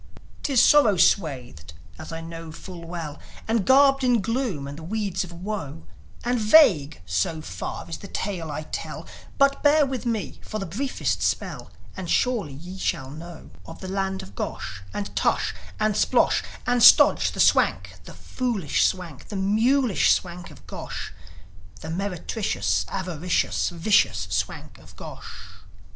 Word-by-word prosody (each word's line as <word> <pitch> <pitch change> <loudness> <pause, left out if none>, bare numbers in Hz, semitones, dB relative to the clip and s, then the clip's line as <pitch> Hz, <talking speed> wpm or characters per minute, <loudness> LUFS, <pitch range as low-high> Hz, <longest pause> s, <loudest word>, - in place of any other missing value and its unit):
'Tis 270 -4 +2
sorrow 240 -7 +6
swathed, 130 - +1 0.3
as - - -8
I 165 0 -5
know 165 0 -8
full 170 +1 -10
well, 165 -4 -6 0.3
And 225 -3 0
garbed 275 0 +5
in 245 -2 +3
gloom 220 - -2
and 145 +2 -8
the - - -10
weeds 200 +1 -2
of 180 - -10
woe, 170 - -6 0.4
And 245 0 0
vague, 190 - +5
so 90 - -1
far, 155 - -6
is 165 - -6
the 200 - -9
tale 185 -5 -4
I 150 +1 -4
tell; - - -6 0.3
But 275 0 +3
bear 295 0 +5
with 260 -2 -4
me 225 -3 -3
for 215 - -5
the 195 - -4
briefest 260 +11 -2
spell, - - -2 0.3
And 185 -3 -6
surely 180 - -1
shall 130 -7 -2
ye 150 - -9
know 170 -1 -11 0.2
Of 165 - -10
the 190 - -7
land 190 0 -2
of 95 - -13
Gosh, 95 0 -5
and 205 -1 -5
Tush, - - +1 0.3
and 215 0 +2
Splosh, - - +3 0.2
And 245 -1 +2
Stodge, - - +7
the - - -8
Swank, - - +3
the - - -11
foolish 230 - -1
Swank, 175 -7 -5
The 210 - -7
mulish 220 +5 +3
Swank 175 -1 -4
of - - -16
Gosh - - -7 0.7
The 160 - -6
meretricious, 195 +3 -1
avaricious, 180 -2 -1
Vicious 175 +4 +2
Swank - - -3
of - - -17
Gosh. - - -10
190 Hz, 155 wpm, -24 LUFS, 165-225 Hz, 0.7 s, Stodge